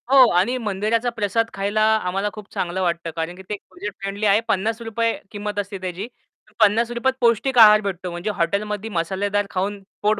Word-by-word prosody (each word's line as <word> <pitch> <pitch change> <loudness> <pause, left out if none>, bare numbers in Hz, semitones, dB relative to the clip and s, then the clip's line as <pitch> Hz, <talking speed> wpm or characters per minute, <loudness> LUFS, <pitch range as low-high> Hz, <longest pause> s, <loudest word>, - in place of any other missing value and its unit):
हो. 265 -2 +8
आणि 200 +9 +2
मंदिराचा 220 +2 0
प्रसाद 225 0 -1
खायला 200 +2 -1 0.2
आम्हाला 195 +3 -1
खूप 210 -1 -11
चांगलं 180 +1 -2
वाटतं, 170 -2 -1
कारण 165 +1 -3
की 190 - -12
ते 210 - -2
बजेट 210 0 -6
फ्रेंडली 195 +2 -3
आहे. 205 +1 +5
50 225 +2 0 0.2
किंमत 205 0 -4
असते 200 0 -4
त्याची. 185 +3 -4 0.5
50त 235 +5 +3
पौष्टिक 240 +2 +2
आहार 215 -1 +9
भेटतो 185 -3 -4
म्हणजे 175 +4 -4
हॉटेलम 200 +5 0 0.2
मसालेदार 195 +4 0
खाऊन 195 +2 -2 0.2
पोट 210 0 +2
205 Hz, 165 wpm, -22 LUFS, 190-225 Hz, 0.5 s, आहार